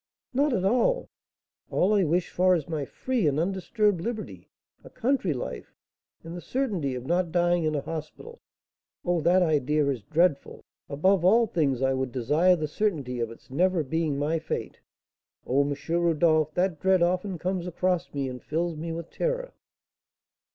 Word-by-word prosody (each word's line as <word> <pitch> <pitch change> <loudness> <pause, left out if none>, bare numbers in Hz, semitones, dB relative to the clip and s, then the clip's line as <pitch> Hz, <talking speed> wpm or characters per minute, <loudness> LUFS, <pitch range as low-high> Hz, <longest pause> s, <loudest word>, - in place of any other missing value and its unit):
"Not 285 +3 +2
at 190 -6 0
all! 255 - +2 0.6
All 195 +4 +2
I 200 -2 +4
wish 175 +2 0
for 185 0 +3
is 160 -5 -3
my 155 -4 -3
free 245 - -1
and 145 +1 +1
undisturbed 195 +2 0
liberty, 225 +2 -6 0.3
a - - -12
country 240 - 0
life, 130 - -6 0.5
and 165 +1 -8
the 175 - -6
certainty 185 - -2
of 125 0 -6
not 175 +2 0
dying 175 -1 +2
in 155 -1 0
a 145 - -1
hospital. 165 - -8 0.6
Oh, 175 -2 +1
that 180 +3 +4
idea 150 -2 +2
is 130 -5 -2
dreadful! 160 - 0 0.2
Above 180 +6 +2
all 225 +6 +5
things, 140 - 0
I 135 0 +2
would 130 -1 -2
desire 150 +9 +3
the 155 -3 -3
certainty 145 - -2
of 115 -1 -1
its 115 - -15
never 175 +3 +2
being 155 0 -1
my 155 +3 0
fate. 160 - -5 0.7
Oh, 135 +3 +2
M. 140 0 -1
Rodolph, 165 -2 +2
that 180 -3 0
dread 190 0 +3
often 180 +2 0
comes 180 +1 -2
across 180 0 -1
me 140 -2 -2
and 125 -1 -7
fills 170 +2 -2
me 165 +2 -5
with 165 0 -6
terror." - - -2
170 Hz, 170 wpm, -27 LUFS, 150-185 Hz, 0.7 s, all